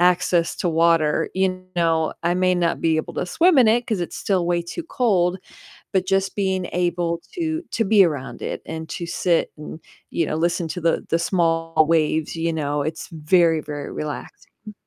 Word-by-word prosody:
access 175 Hz, -1 st, +2 dB
to 175 Hz, -, -1 dB
water, 165 Hz, -2 st, +2 dB
you 185 Hz, -1 st, 0 dB
know, 165 Hz, -2 st, +1 dB
I 175 Hz, +1 st, +2 dB
may 185 Hz, 0 st, +2 dB
not 170 Hz, -1 st, 0 dB
be 160 Hz, -1 st, +2 dB
able 155 Hz, -, -3 dB
to -, -, -1 dB
swim 335 Hz, -, +4 dB
in 240 Hz, -4 st, +6 dB
it 240 Hz, +2 st, +2 dB
'cause 220 Hz, -7 st, -1 dB
it's 175 Hz, -, -4 dB
still 190 Hz, -3 st, 0 dB
way 175 Hz, 0 st, +1 dB
too 170 Hz, -, -6 dB
cold, 190 Hz, -, +1 dB, 0.6 s
but 190 Hz, -1 st, +2 dB
just 195 Hz, 0 st, 0 dB
being 190 Hz, -3 st, -1 dB
able 175 Hz, -1 st, 0 dB
to 325 Hz, -1 st, -2 dB
to 225 Hz, -, 0 dB
be 200 Hz, -1 st, +6 dB
around 145 Hz, -5 st, -4 dB
it -, -, -4 dB
and 160 Hz, 0 st, -6 dB
to 170 Hz, -, -4 dB
sit 170 Hz, 0 st, +1 dB
and, 150 Hz, +1 st, -8 dB, 0.3 s
you 165 Hz, -, 0 dB
know, -, -, -2 dB
listen 170 Hz, +1 st, 0 dB
to 180 Hz, +1 st, -5 dB
the 165 Hz, 0 st, +1 dB
the 165 Hz, -, +2 dB
small 165 Hz, -2 st, +1 dB
waves, 160 Hz, -1 st, +1 dB
you 165 Hz, 0 st, -1 dB
know, 145 Hz, -2 st, -1 dB
it's 160 Hz, +2 st, -5 dB
very, 165 Hz, 0 st, +3 dB
very 145 Hz, -1 st, -6 dB
relaxing. 155 Hz, +7 st, -8 dB
170 Hz, 190 wpm, -22 LUFS, 160-185 Hz, 0.6 s, in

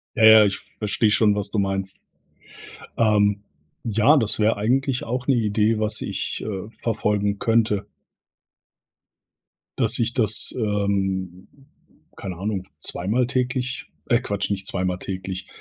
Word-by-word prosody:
Ja, 115 Hz, -, +1 dB
ja, 110 Hz, -1 st, +9 dB
ich 100 Hz, -1 st, -1 dB, 0.2 s
verstehe 105 Hz, +1 st, +1 dB
schon, 105 Hz, -1 st, +3 dB
was 100 Hz, -1 st, -2 dB
du 110 Hz, -, -3 dB
meinst. 95 Hz, -1 st, -2 dB, 1.0 s
Ähm, 105 Hz, -2 st, +3 dB, 0.4 s
ja, 115 Hz, +7 st, +4 dB
das 110 Hz, -5 st, -1 dB
wäre 110 Hz, 0 st, +2 dB
eigentlich 130 Hz, +5 st, 0 dB
auch 125 Hz, +2 st, -3 dB
'ne 135 Hz, -, +4 dB
Idee, 110 Hz, -1 st, +1 dB
was 110 Hz, 0 st, 0 dB
ich, -, -, -3 dB
äh, 100 Hz, 0 st, -5 dB
verfolgen 105 Hz, -3 st, 0 dB
könnte. 110 Hz, -3 st, +1 dB, 1.9 s
Dass -, -, +2 dB
ich 115 Hz, 0 st, 0 dB
das, 110 Hz, -4 st, +1 dB
ähm, 95 Hz, -4 st, -1 dB, 0.7 s
keine 95 Hz, -3 st, -6 dB
Ahnung, 95 Hz, 0 st, -3 dB
zweimal 105 Hz, +8 st, -1 dB
täglich 125 Hz, +1 st, -2 dB, 0.2 s
äh, 120 Hz, -, +3 dB
Quatsch, 100 Hz, -5 st, -3 dB
nicht 95 Hz, -1 st, -3 dB
zweimal 90 Hz, -1 st, -2 dB
täglich, 95 Hz, -1 st, -5 dB
105 Hz, 130 wpm, -23 LUFS, 100-115 Hz, 1.9 s, ja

